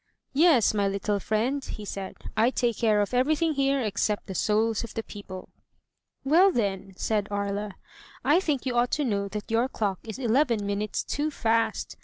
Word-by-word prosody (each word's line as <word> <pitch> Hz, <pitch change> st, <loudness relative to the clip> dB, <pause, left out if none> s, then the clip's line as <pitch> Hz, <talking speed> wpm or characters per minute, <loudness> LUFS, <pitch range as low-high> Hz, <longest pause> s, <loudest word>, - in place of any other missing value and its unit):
"Yes, 285 Hz, -, +5 dB
my 200 Hz, -2 st, +1 dB
little 200 Hz, +1 st, -1 dB
friend," 235 Hz, +8 st, -1 dB
he 215 Hz, -, -7 dB
said, 195 Hz, -1 st, -6 dB, 0.2 s
"I 225 Hz, +2 st, +4 dB
take 240 Hz, -3 st, 0 dB
care 215 Hz, -3 st, +3 dB
of 205 Hz, -, -2 dB
everything 310 Hz, +6 st, +2 dB
here 275 Hz, -1 st, +1 dB
except 210 Hz, -1 st, -1 dB
the 195 Hz, -, -6 dB
souls 215 Hz, +4 st, +1 dB
of 230 Hz, -, -9 dB
the 225 Hz, -, -2 dB
people." 190 Hz, -4 st, -9 dB, 0.7 s
"Well, 345 Hz, +8 st, +5 dB
then," 195 Hz, -, -2 dB
said 210 Hz, -2 st, 0 dB
Aria, 200 Hz, 0 st, -3 dB, 0.3 s
" -, -, -22 dB
I 340 Hz, -, +6 dB
think 300 Hz, -9 st, -1 dB
you 255 Hz, -, -1 dB
ought 240 Hz, +1 st, +3 dB
to 295 Hz, -, +1 dB
know 200 Hz, -4 st, -1 dB
that 210 Hz, +2 st, -6 dB
your 235 Hz, +3 st, +2 dB
clock 200 Hz, -7 st, -2 dB
is 220 Hz, +1 st, -7 dB
eleven 240 Hz, -3 st, +1 dB
minutes 205 Hz, +1 st, -2 dB
too 295 Hz, +1 st, -1 dB
fast. 225 Hz, -5 st, 0 dB
220 Hz, 185 wpm, -27 LUFS, 205-260 Hz, 0.7 s, I